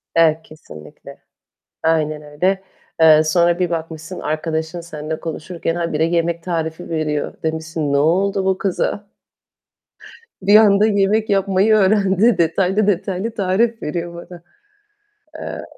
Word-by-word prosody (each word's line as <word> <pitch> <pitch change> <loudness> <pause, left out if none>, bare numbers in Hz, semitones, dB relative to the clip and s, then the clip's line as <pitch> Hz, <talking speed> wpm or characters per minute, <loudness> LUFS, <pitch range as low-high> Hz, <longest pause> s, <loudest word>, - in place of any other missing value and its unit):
Evet, 160 -1 +4
kesinlikle. 115 - -13 0.7
Aynen 155 -2 0
öyle. 180 +6 -1 0.4
Eee, 155 -1 +7
sonra 170 +1 +2
bir 180 -2 0
bakmışsın 165 +1 -5
arkadaşın 160 +2 -3
seninle 155 -1 -6
konuşurken 165 +1 -4
habire 165 -2 -1
yemek 170 0 0
tarifi 165 -1 -4
veriyor. 155 -2 -2
Demişsin, 160 -2 -3
"Ne - - +3
oldu 190 +6 +1
bu 190 0 +1
kıza? 200 +1 -2 1.4
Bir 200 +2 +4
anda 210 -1 +6
yemek 210 +1 +1
yapmayı 195 +1 +2
öğrendi. 205 +2 +3
Detaylı 185 +5 +1
detaylı 195 +2 -1
tarif 220 +4 0
veriyor 170 +2 -4
bana." 170 0 -11 1.0
Eee - - -6
170 Hz, 120 wpm, -19 LUFS, 160-195 Hz, 1.4 s, Eee